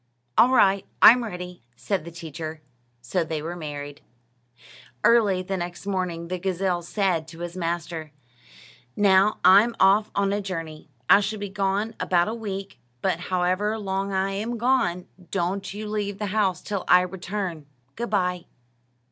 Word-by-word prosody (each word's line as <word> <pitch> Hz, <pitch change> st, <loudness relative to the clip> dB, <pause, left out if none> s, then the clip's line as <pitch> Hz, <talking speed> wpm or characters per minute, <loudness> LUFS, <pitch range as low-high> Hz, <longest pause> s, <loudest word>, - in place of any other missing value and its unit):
"All 245 Hz, -, +6 dB
right; 195 Hz, -6 st, +4 dB, 0.2 s
I'm 245 Hz, +1 st, +8 dB
ready," 180 Hz, -, -7 dB
said 185 Hz, -, -2 dB
the -, -, -7 dB
teacher. 160 Hz, -1 st, -7 dB, 0.4 s
So 145 Hz, +9 st, -1 dB
they 160 Hz, -1 st, -3 dB
were 165 Hz, +3 st, -5 dB
married. 145 Hz, -3 st, -7 dB, 1.0 s
Early 205 Hz, -6 st, +4 dB
the 190 Hz, +1 st, -3 dB
next 175 Hz, +1 st, -6 dB
morning 180 Hz, -4 st, -2 dB
the 185 Hz, +1 st, -3 dB
gazelle 185 Hz, -1 st, -1 dB
said 175 Hz, -3 st, -1 dB
to 165 Hz, +1 st, -11 dB
his 175 Hz, 0 st, -5 dB
master: 170 Hz, -3 st, -4 dB, 0.8 s
"Now 200 Hz, +1 st, +4 dB
I'm 220 Hz, +5 st, +6 dB
off 200 Hz, +3 st, +4 dB
on 200 Hz, 0 st, +1 dB
a 205 Hz, -, -1 dB
journey. 165 Hz, -6 st, -6 dB, 0.2 s
I 200 Hz, -, +7 dB
shall 210 Hz, +2 st, -2 dB
be 205 Hz, -1 st, -5 dB
gone 200 Hz, +3 st, -1 dB
about 175 Hz, 0 st, +2 dB
a 220 Hz, -, -2 dB
week; 200 Hz, -4 st, -6 dB, 0.2 s
but 180 Hz, -3 st, +1 dB
however 185 Hz, +4 st, 0 dB
long 195 Hz, -1 st, -2 dB
I 190 Hz, 0 st, 0 dB
am 220 Hz, +5 st, -3 dB
gone, 225 Hz, -8 st, +1 dB, 0.2 s
don't 195 Hz, +1 st, -2 dB
you 210 Hz, +2 st, -6 dB
leave 205 Hz, -2 st, -3 dB
the 210 Hz, -, -3 dB
house 200 Hz, -4 st, +1 dB
till 200 Hz, -3 st, -3 dB
I 180 Hz, -, +7 dB
return. 180 Hz, -3 st, -5 dB, 0.3 s
Good 235 Hz, 0 st, -4 dB
bye." 180 Hz, -3 st, 0 dB
190 Hz, 155 wpm, -25 LUFS, 175-205 Hz, 1.0 s, I'm